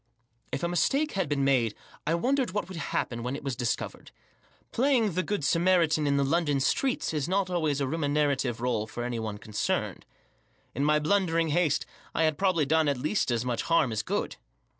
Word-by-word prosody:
If 135 +4 -3
a - - +2
mistake 275 - +1
had 190 -6 -1
bc«n 140 -2 0
made 125 -5 +2 0.3
I 165 - +2
wondered 255 +3 0
what 205 -4 -2
would 190 - -8
happen 120 -6 -2
when 125 +3 -3
it 145 - -7
was 135 -3 -2
discovered. 125 +1 -3 0.6
Playing 245 -4 +2
the 180 - +1
Good 200 -1 -2
Samaritan 165 -1 +3
in 140 0 +2
the 140 - +3
London 145 -1 +1
streets 250 - 0
is 150 0 -1
not 190 -1 0
always 155 -5 0
a 140 - 0
remunerative 145 -4 0
rdle 115 -3 -1
for 120 - -5
any 120 -1 -3
one 110 -2 -4
concerned. 105 0 -2 0.7
In 140 - -1
my 150 +1 +4
blundering 165 0 +1
haste 150 -2 +1 0.3
I 165 - +2
had 155 -2 +1
probably 185 -6 +2
done 160 +2 +2
at 140 -2 +1
least 155 +8 0
as 120 0 0
much 120 -2 -1
harm 165 -7 +2
as 110 -1 -1
good. - - -3
150 Hz, 195 wpm, -28 LUFS, 130-175 Hz, 0.7 s, my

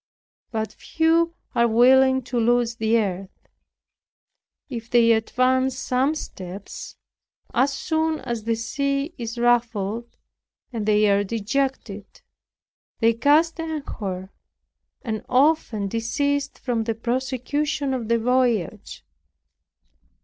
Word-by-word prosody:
But 220 -2 -3
few 330 +1 +1 0.2
are 235 0 +3
willing 260 +3 +5
to 245 0 -2
lose 235 0 +2
the 220 +1 +2
earth. 195 -3 -4 1.2
If 235 -5 -7
they 235 -1 +5
advance 255 +3 +2
some 265 +5 0
steps, 190 - -8 0.6
as 265 +3 +3
soon 315 +2 -1
as 235 -3 -4
the 230 0 +1
sea 275 +6 -2
is 230 0 -5
ruffled 235 -2 0 0.5
they 215 -2 +2
are 200 0 +3
dejected; 225 -1 -3 0.8
they 230 0 +4
cast 305 +8 +3
anchor, 215 - -5 0.7
and 220 -2 -3
often 255 -6 +2
desist 280 +7 -1
from 235 -3 -2
the 225 -1 -1
prosecution 260 +4 -1
of 240 -4 -3
the 235 +1 +3
voyage. 240 -5 0
240 Hz, 105 wpm, -23 LUFS, 220-275 Hz, 1.2 s, willing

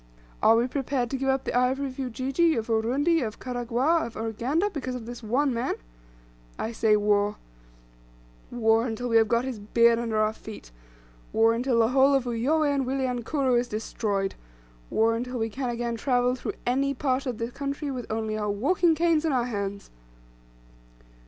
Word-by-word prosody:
Are 220 +1 +6
we 235 +1 +3
prepared 255 -2 -2
to - - -1
give 270 0 -1
up 265 0 +1
the - - -3
ivory 255 +3 +2
of 265 0 -7
Ujiji, 270 +6 +1
of 225 0 -3
Urundi, 265 +9 +2
of 220 -3 -4
Karagwah, 250 +6 0
of 230 - -12
Uganda, 245 - -1
because 260 -6 -4
of 240 -3 -6
this 240 +1 -8
one 255 +5 +1
man? 235 +1 -1 0.8
I 225 - -3
say 220 -2 +3
war 205 0 +2 1.1
war 225 0 +2
until 240 +2 -3
we 230 - +4
have 225 -1 +4
got 235 +2 +1
his 255 -5 -4
beard 230 +3 +3
under 230 -2 -2
our 215 0 +2
feet 215 - -11 0.6
war 225 +1 +4
until 245 +1 0
the 225 -1 +4
whole 270 +2 +4
of 270 - +2
Uyoweh 285 +6 +1
and 275 -1 0
Wilyankuru 260 0 0
is 245 - -2
destroyed 210 -3 -2 0.6
war 225 +1 +2
until 250 +2 -3
we 225 -1 -2
can 260 +2 -3
again 235 -1 -2
travel 245 0 +1
through 255 - -4
any 275 +3 +1
part 265 0 -1
of 245 -3 -3
the 230 +2 -4
country 280 +2 -4
with 250 -4 -6
only 220 -1 -2
our 210 -1 -2
walking 320 - +2
canes 330 -1 +2
in 320 - +1
our 250 -3 +1
hands!" 200 -4 -4
245 Hz, 180 wpm, -26 LUFS, 225-270 Hz, 1.1 s, Are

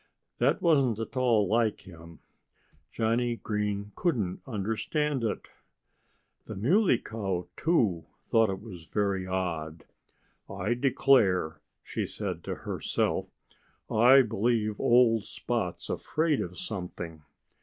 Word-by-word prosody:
That 200 - +2
wasn't 140 - +3
at 115 +4 -6
all 120 -6 +3
like 110 +1 +1
him. 85 -2 -13 0.7
Johnnie 120 +1 0
Green 105 -2 -3
couldn't 115 - -1
understand 115 +6 -1
it. 110 - -2 1.0
The - - -7
Muley 165 - +3
Cow, 95 -6 -4
too, 105 - +1 0.2
thought 115 -2 +3
it 95 +1 -4 0.3
very 100 -3 0
odd. 85 -4 -3 0.6
"I 115 - -1
declare," 120 - +2 0.2
she - - -3
said - - -5
to - - -3
herself, - - -1 0.6
"I 125 +5 +7
believe 110 -1 0
old 120 -3 +4
Spot's - - -3
afraid 155 -2 0
of 90 +1 -6
something. 85 -5 -6
110 Hz, 110 wpm, -28 LUFS, 95-125 Hz, 1.0 s, I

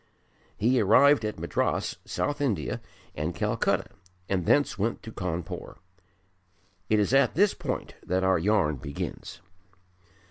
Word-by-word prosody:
He 120 +3 +3
arrived 115 +6 +5
at 105 0 -3
Madras - - -1
(South 145 0 -2
India) 105 - -1 0.3
and 75 +3 -3
Calcutta - - 0 0.4
and 90 -3 -1
thence 145 - +3
went 110 +4 -2
to 110 - -8
Cawnpore. 90 -4 -5 1.1
It 110 - +4
is 105 +4 +1
at 135 -3 +4
this 200 +3 +4
point - - -4
that 95 +1 0
our 95 -2 +3
yarn 90 -6 +2
begins. 70 +5 -6
105 Hz, 130 wpm, -27 LUFS, 90-125 Hz, 1.1 s, arrived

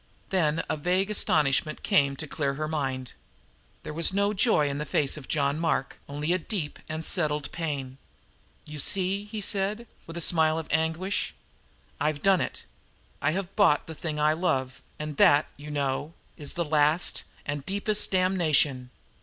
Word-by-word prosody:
Then 165 -4 +1
a 155 - -1
vague 185 +6 0
astonishment 155 -6 +1
came 140 -1 +3
to 155 - -5
clear 140 -2 -2
her 155 +2 -3
mind. 135 -5 -3 0.7
There - - -6
was 165 +3 +4
no 200 +2 +1
joy 195 -7 +3
in 140 0 -3
the - - -1
face 140 -1 +1
of 150 -4 -10
John 145 0 0
Mark, 165 -5 -1
only 150 +4 -1
a 185 - +1
deep 170 -5 -4
and 160 +1 -2
settled 150 -5 +2
pain. 140 -6 -4 0.7
"You 150 0 -8
see," 195 +5 +1
he 210 0 -6
said, 205 +3 0 0.2
with 165 +1 -7
a - - -1
smile 160 -1 +3
of 160 - -4
anguish, 160 +5 -1 0.6
"I 150 - +1
have 150 -2 -2
done 195 -2 +4
it. - - -4 0.6
I 145 +3 +1
have 195 0 -4
bought 195 -8 +4
the 160 - -7
thing 155 0 -4
I 150 +1 +3
love, 130 -6 -1 0.2
and 150 -1 -5
that, 145 +1 +6
you 145 +1 -10
know, 145 +2 -2 0.2
is 145 -2 -4
the 170 -1 -2
last 150 +2 +2 0.2
and 145 -1 -3
deepest 205 +5 +1
damnation. 155 -9 +2
155 Hz, 170 wpm, -27 LUFS, 145-180 Hz, 0.7 s, that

